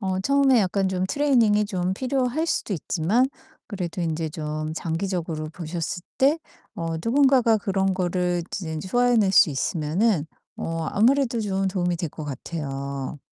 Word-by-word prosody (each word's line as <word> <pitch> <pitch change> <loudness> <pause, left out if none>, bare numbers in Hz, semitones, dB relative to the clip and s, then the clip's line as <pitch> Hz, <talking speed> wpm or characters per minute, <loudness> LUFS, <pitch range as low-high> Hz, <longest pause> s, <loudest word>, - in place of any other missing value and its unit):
어 190 -2 -1
처음에 275 +1 +4
약간 195 0 +1
좀 185 -1 -1
트레이닝이 235 -8 +3
좀 185 -3 -1
필요할 260 +6 -1
수도 265 - -1
있지만 190 - +1 0.4
그래도 180 -4 -4
인제 160 0 -2
좀 155 -1 -4
장기적으로 165 -1 -3
보셨을 170 +1 -4
때 285 +5 +4 0.4
어 165 -1 -3
누군가가 255 -2 +4
그런 195 -1 0
거를 180 -1 0
이제 160 -5 -4
소화해 245 +4 +3
낼 200 -4 +3
수 170 - +6
있으면은 160 - 0 0.3
어 165 -1 -3
아무래도 240 +1 +3
좀 195 -2 -1
도움이 180 -2 0
될 165 -1 -3
것 155 - -7
같아요. 140 -1 -5
185 Hz, 315 characters per minute, -24 LUFS, 165-230 Hz, 0.4 s, 수